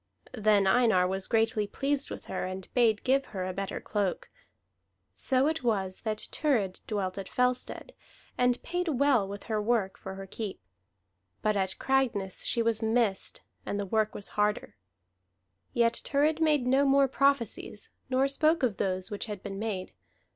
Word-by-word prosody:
Then 210 Hz, -4 st, +3 dB
Einar 190 Hz, -3 st, +4 dB
was 190 Hz, +1 st, -2 dB
greatly 225 Hz, -2 st, +1 dB
pleased 280 Hz, +5 st, -1 dB
with -, -, -7 dB
her, 190 Hz, -, -3 dB
and 185 Hz, 0 st, -5 dB
bade 230 Hz, -4 st, +3 dB
give 270 Hz, +1 st, +2 dB
her 190 Hz, -3 st, -5 dB
a 185 Hz, -, -3 dB
better 195 Hz, 0 st, -4 dB
cloak. 200 Hz, -4 st, -2 dB, 0.8 s
So 260 Hz, 0 st, +2 dB
it 315 Hz, -2 st, 0 dB
was 195 Hz, -5 st, 0 dB
that 215 Hz, -1 st, -3 dB
Thurid 225 Hz, -12 st, 0 dB
dwelt 200 Hz, -3 st, -2 dB
at 195 Hz, -, -7 dB
Fellstead, 250 Hz, -, -1 dB, 0.4 s
and 250 Hz, 0 st, +1 dB
paid 355 Hz, +1 st, -2 dB
well 275 Hz, -7 st, +3 dB
with 200 Hz, +1 st, -7 dB
her 215 Hz, -2 st, -1 dB
work 210 Hz, -3 st, 0 dB
for 190 Hz, 0 st, -7 dB
her 195 Hz, 0 st, -7 dB
keep; 200 Hz, 0 st, -6 dB, 0.8 s
but 215 Hz, 0 st, +2 dB
at 190 Hz, -1 st, -1 dB
Cragness 235 Hz, -8 st, 0 dB
she 235 Hz, -, +1 dB
was 225 Hz, -1 st, +1 dB
missed, 220 Hz, -3 st, +1 dB, 0.2 s
and 205 Hz, -, -3 dB
the 200 Hz, -, -2 dB
work 215 Hz, +2 st, 0 dB
was 200 Hz, -, -4 dB
harder. 210 Hz, 0 st, -1 dB, 1.0 s
Yet 235 Hz, -1 st, +2 dB
Thurid 300 Hz, +3 st, +1 dB
made 300 Hz, -5 st, +3 dB
no 265 Hz, +2 st, +4 dB
more 275 Hz, 0 st, +4 dB
prophecies, 265 Hz, -6 st, 0 dB, 0.2 s
nor 265 Hz, +1 st, +3 dB
spoke 310 Hz, +3 st, +2 dB
of 230 Hz, -6 st, +1 dB
those 185 Hz, +1 st, -2 dB
which 205 Hz, -, -3 dB
had 205 Hz, -3 st, -6 dB
been 195 Hz, -1 st, -5 dB
made. 205 Hz, -4 st, -3 dB
220 Hz, 165 wpm, -29 LUFS, 195-260 Hz, 1.0 s, Einar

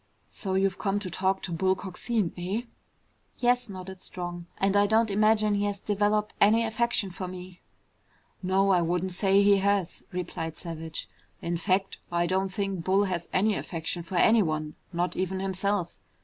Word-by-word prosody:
"So 190 Hz, -3 st, -3 dB
you've 190 Hz, 0 st, +1 dB
come 195 Hz, 0 st, 0 dB
to 185 Hz, -3 st, -5 dB
talk 190 Hz, +2 st, 0 dB
to 180 Hz, -, -4 dB
Bull 185 Hz, +3 st, +2 dB
Coxine, 195 Hz, +1 st, -2 dB
eh?" 190 Hz, +6 st, -2 dB, 0.7 s
"Yes," 245 Hz, -1 st, +2 dB
nodded 190 Hz, -1 st, -8 dB
Strong. 175 Hz, -1 st, -6 dB
"And 195 Hz, +1 st, +1 dB
I 205 Hz, 0 st, +5 dB
don't 220 Hz, 0 st, +3 dB
imagine 215 Hz, +1 st, +3 dB
he 205 Hz, 0 st, +1 dB
has 205 Hz, -1 st, -2 dB
developed 210 Hz, +1 st, +1 dB
any 220 Hz, +3 st, +6 dB
affection 225 Hz, -3 st, 0 dB
for 185 Hz, +1 st, -5 dB
me." 180 Hz, 0 st, -9 dB, 0.8 s
"No, 195 Hz, +1 st, +2 dB
I 180 Hz, -2 st, +4 dB
wouldn't 175 Hz, +2 st, 0 dB
say 195 Hz, +1 st, +4 dB
he 200 Hz, 0 st, +6 dB
has," 200 Hz, -2 st, 0 dB
replied 165 Hz, -3 st, -4 dB
Savage. 165 Hz, -2 st, -6 dB, 0.3 s
"In 170 Hz, +1 st, -2 dB
fact, 190 Hz, +2 st, 0 dB
I 170 Hz, 0 st, +2 dB
don't 190 Hz, +2 st, 0 dB
think 195 Hz, -3 st, -3 dB
Bull 190 Hz, +3 st, +3 dB
has 180 Hz, -4 st, -2 dB
any 210 Hz, +3 st, +3 dB
affection 170 Hz, -2 st, -3 dB
for 185 Hz, +2 st, -7 dB
anyone, 160 Hz, -8 st, +3 dB, 0.2 s
not 175 Hz, +1 st, -1 dB
even 190 Hz, +1 st, -1 dB
himself. 195 Hz, -1 st, -1 dB
190 Hz, 165 wpm, -28 LUFS, 180-205 Hz, 0.8 s, any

